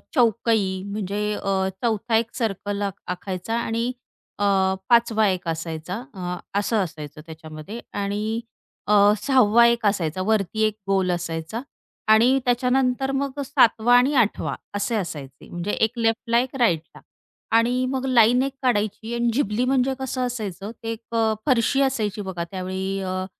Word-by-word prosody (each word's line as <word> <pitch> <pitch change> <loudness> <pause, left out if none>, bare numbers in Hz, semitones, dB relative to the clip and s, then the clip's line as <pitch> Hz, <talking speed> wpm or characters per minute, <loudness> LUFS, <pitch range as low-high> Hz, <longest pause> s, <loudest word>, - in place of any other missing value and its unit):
चौकई 220 -5 +2
म्हणजे 205 +1 -2
अ, 190 -1 +1
चौथा 225 0 0
एक 230 0 -2
सर्कल 205 -3 -2
आक 200 -1 -1 0.2
आखायचा 185 +4 -4
आणि 230 +1 -1 0.5
अ, - - 0 0.5
5 235 -1 +5
वा 215 -1 +3
एक 185 -2 -2
असायचा, 165 +2 -4 0.2
अ, 180 -2 -4 0.2
असं 220 +2 0
असायचं 155 -3 -8
त्याच्यामध्ये. 160 +6 -9
आणि 210 +3 -2 0.5
अ, 210 - +3 0.3
6 265 +2 +4
वा 235 0 +7
एक 235 -1 +1
असायचा, 185 -4 0
वरती 220 0 +1
एक 215 - -5
गोल 190 -2 +2
असायचा 170 +5 -3 0.5
आणि 245 +5 +5
त्याच्यानंतर 250 +2 +1
मग 275 +1 -2
7 250 -6 +3
वा 245 +2 +5
आणि 265 +4 +3
8 215 -3 +2
वा - - -2 0.2
असे 205 +3 -1
असायचे 145 -9 -6
म्हणजे 175 +4 -3
1 225 +3 0
लेफ्टला, 230 +1 +1
1 255 +2 -3
राईटला. 170 -10 0 0.6
आणि 250 +2 +2
मग 265 -1 -2
लाईन 245 -1 +5
1 275 0 -3
काढायची 220 -1 0
आणि 235 0 +1
झिबली 230 -2 0
म्हणजे 265 0 +2
कसं 265 -1 -3
असायचं 210 -4 -5
ते 225 - -2
एक 230 +1 -8
अ, 225 -1 +2
फरशी 260 +2 +3
असायची 220 -6 0
बघा 190 -3 -4
त्यावेळी, 190 +1 -3
अ, 185 0 -3
220 Hz, 155 wpm, -23 LUFS, 190-240 Hz, 0.6 s, वा